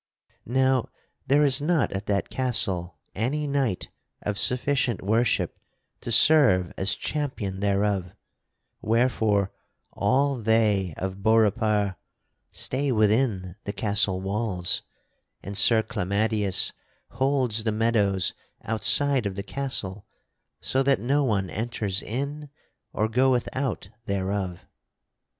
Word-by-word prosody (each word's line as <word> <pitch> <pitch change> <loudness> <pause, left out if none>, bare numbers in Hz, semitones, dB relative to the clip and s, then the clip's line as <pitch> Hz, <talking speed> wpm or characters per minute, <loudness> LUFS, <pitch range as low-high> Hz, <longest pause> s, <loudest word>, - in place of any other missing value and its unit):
"Now 130 0 +1 0.4
there 145 +3 +4
is 135 0 +2
not 155 -3 +1
at 95 +2 -5
that 100 -1 -1
castle 95 - -1 0.2
any 135 +8 -2
knight 135 -9 -1 0.3
of 105 -1 -2
sufficient 125 -3 +2
worship 115 +4 0 0.4
to 120 - -6
serve 115 - +5
as 95 +1 0
champion 130 -11 -4
thereof, 100 -2 0 0.7
wherefore 110 -4 +1 0.4
all 135 +6 +1
they 105 -6 +1
of 95 +1 -5
Beaurepaire 105 -2 +2 0.5
stay 140 +1 -2
within 105 -4 +1
the 100 - -4
castle 100 -3 0
walls 95 -2 -1 0.6
and 100 +2 -7
Sir 110 +2 +5
Clamadius 105 -2 +1 0.4
holds 130 -5 0
the 110 - 0
meadows 105 -4 +1 0.3
outside 130 +2 +3
of 95 - -5
the 100 - -5
castle 105 -7 -3 0.5
so 135 - +1
that 135 0 +2
no 140 +4 +1
one 100 -7 0
enters 105 -3 -2
in 140 +5 -5 0.4
or 110 - 0
goeth 125 +2 +1
out 130 -7 -3 0.2
thereof. 95 -2 -3
110 Hz, 110 wpm, -25 LUFS, 100-130 Hz, 0.7 s, serve